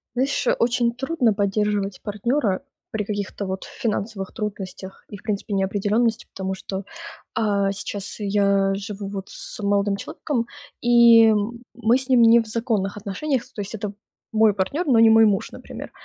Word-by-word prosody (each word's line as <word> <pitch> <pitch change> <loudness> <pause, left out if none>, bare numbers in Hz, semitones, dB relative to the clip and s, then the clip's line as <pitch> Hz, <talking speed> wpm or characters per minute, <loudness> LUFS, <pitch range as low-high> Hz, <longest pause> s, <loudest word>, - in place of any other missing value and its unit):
Знаешь, 265 +1 0
очень 235 0 +2
трудно 265 -2 +1
поддерживать 200 -1 0
партнера 210 0 0 0.3
при 220 -3 -2
каких-то 200 -1 -4
вот 190 0 -4
финансовых 205 -3 -3
трудностях, 195 -3 -6
и, 205 - -8
в - - -18
принципе, 210 -1 -3
неопределенности, 205 +4 +1
потому 190 0 -3
что, 190 +1 -6 0.5
а, 200 -3 +1
сейчас 200 0 -5
я 200 -1 +2
живу 200 0 -5
вот 195 -1 -6
с - - -6
молодым 200 0 +1
человеком 235 +4 -3 0.3
и 235 -2 +7 0.4
мы 235 +1 +3
с 265 0 -7
ним 250 -3 +5
не 230 +1 +7
в 225 - -5
законных 215 -3 -1
отношениях, 225 +7 -2
то - - -5
есть 200 +2 -5
это 210 -1 -4 0.4
мой 220 -1 +4
партнер, 245 - -1
но 255 -5 +4
не 225 - +7
мой 225 0 +7
муж, 200 -2 0
например. - - -9
210 Hz, 155 wpm, -23 LUFS, 200-230 Hz, 0.5 s, и